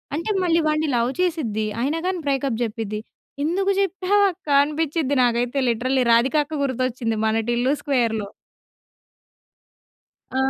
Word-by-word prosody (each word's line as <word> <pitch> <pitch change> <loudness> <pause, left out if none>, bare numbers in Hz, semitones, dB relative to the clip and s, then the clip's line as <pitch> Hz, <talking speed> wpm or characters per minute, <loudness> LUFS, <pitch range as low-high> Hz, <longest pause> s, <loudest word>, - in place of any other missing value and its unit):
అంటే 335 +8 -2
మళ్ళీ 335 -1 +3
వాడిని 305 0 +1
లవ్ 235 +2 +1
చేసిద్ది. 265 - -1 0.2
అయినా 295 +6 0
కాని 370 -1 -1
బ్రేకప్ 270 -4 0
చెప్పిద్ది. 215 -2 -4 0.4
ఎందుకు 385 +6 +1
చెప్పావు 390 +1 +2
అక్క? 350 -3 -21 0.2
అనిపించిద్ది. 300 -1 -1
నాకైతే 245 +3 +1
లిటరల్లీ 255 +3 +1
రాధిక 240 +5 +3
అక్క 305 -1 -5
గుర్తొచ్చింది 255 -3 -1
మన 220 0 +1
'టిల్లు 245 +4 +1
స్క్వేర్‌లో'. 230 -7 0 2.0
ఆ! 260 - -5
270 Hz, 125 wpm, -22 LUFS, 235-325 Hz, 2.0 s, మళ్ళీ